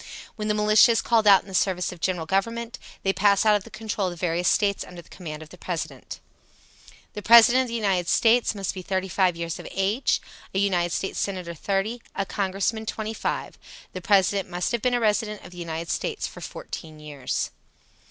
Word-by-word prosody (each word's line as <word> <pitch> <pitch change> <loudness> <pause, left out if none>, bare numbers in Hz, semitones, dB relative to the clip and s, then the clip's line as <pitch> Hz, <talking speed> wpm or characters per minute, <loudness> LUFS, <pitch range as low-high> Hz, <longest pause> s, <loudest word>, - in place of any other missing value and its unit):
When 210 -1 -4
the 210 - +1
militia 215 +3 +5
is 225 - +1
called 225 -3 +2
out 195 -2 +7
in - - -20
the 190 - -10
service 185 -1 +1
of 180 - -11
the - - -17
General 180 -3 0
Government, 230 +6 -2 0.2
they 195 - +2
pass 200 +1 +3
out 215 -1 +6
of 205 - -1
the - - -11
control 215 -2 -3
of 180 - -3
the - - -12
various 175 0 0
States 200 -2 +2
under 175 -1 -11
the - - -23
command 155 -4 -8
of 155 - -15
the 180 - -14
President. 170 -3 -5 0.9
The 210 - -6
President 235 +3 +7
of 260 - -2
the 235 - -4
United 195 -6 0
States 230 +2 +3
must 195 -2 -3
be 185 - -6
35 185 -1 0
years 170 -1 -4
of - - -8
age: 200 +7 +1 0.4
a - - +1
United 185 -3 +2
States 190 - -2
Senator, 185 -4 -3
30; 200 +7 -2
a 195 - -1
Congressman, 200 +3 -2
25. 220 0 -4 0.3
The 185 - -6
President 195 0 +2
must 175 0 -2
have 235 -2 -1
been 250 +1 +1
a - - +1
resident 210 -1 0
of - - -11
the 180 - -11
United 165 -1 -4
States 445 -3 -2
fourteen 160 - -8
years. 145 -4 -3
195 Hz, 205 wpm, -25 LUFS, 180-215 Hz, 0.9 s, out